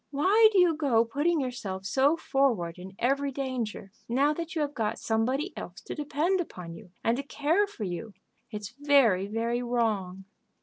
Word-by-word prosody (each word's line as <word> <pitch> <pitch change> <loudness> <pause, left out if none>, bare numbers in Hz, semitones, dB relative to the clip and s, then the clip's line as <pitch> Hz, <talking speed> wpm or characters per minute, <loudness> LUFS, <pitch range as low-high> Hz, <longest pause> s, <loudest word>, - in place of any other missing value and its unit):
Why 390 +10 +5
do 405 - +1
you 355 -3 +5
go 260 -7 +2
putting 295 +8 +1
yourself 210 -8 -4
so 275 +9 +3
forward 230 - 0
in 190 +1 -10
every 275 +3 +1
danger, 250 -7 -4 0.2
now 275 +5 +3
that 335 +2 -6
you 315 - 0
have 290 0 -3
got 225 -3 -2
somebody 255 - -1
else - - -8
to - - -7
depend 310 +5 0
upon 180 - -8
you 170 - -12
and 230 +1 +2
to - - -1
care 305 +8 +1
for 395 - -8
you? 195 +3 -5 0.3
It's 210 -1 -6
very, 260 -10 +4
very 230 +3 -1
wrong." 215 -6 -1
255 Hz, 175 wpm, -28 LUFS, 215-295 Hz, 0.3 s, Why